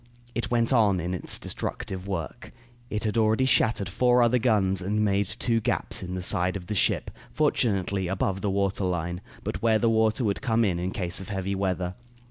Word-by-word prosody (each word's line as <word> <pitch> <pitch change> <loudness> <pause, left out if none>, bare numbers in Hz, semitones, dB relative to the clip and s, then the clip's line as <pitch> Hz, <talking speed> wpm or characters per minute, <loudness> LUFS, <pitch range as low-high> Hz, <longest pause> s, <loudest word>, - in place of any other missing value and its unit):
It 120 - -2
went 120 +1 +2
on 105 -6 +4
in 90 +2 -3
its 90 - -3
destructive 95 0 -5
work. 95 +4 -5 0.4
It 105 - -2
had 110 +1 0
already 110 +4 +3
shattered 110 -6 +2
four 125 +6 +3
other 120 +1 +3
guns 100 -6 +2
and 105 +3 0
made 100 -1 +1
two 115 +3 0
gaps - - -1
in 90 0 -5
the 90 - -4
side 90 +1 +1
of 90 - -10
the 95 - -4
ship, 100 - +1 0.2
fortunately 100 -10 +1
above 95 +1 -1
the 105 - 0
water 100 0 0
line, 90 0 -2 0.2
but - - -4
where 115 -1 +4
the 115 +1 +2
water 110 +2 +2
would 100 -3 0
come 115 -4 +2
in, 90 -4 0
in 90 +1 -2
case 90 -1 -2
of 95 - -9
heavy 95 0 -2
weather. 95 -2 -1
100 Hz, 200 wpm, -26 LUFS, 95-110 Hz, 0.4 s, on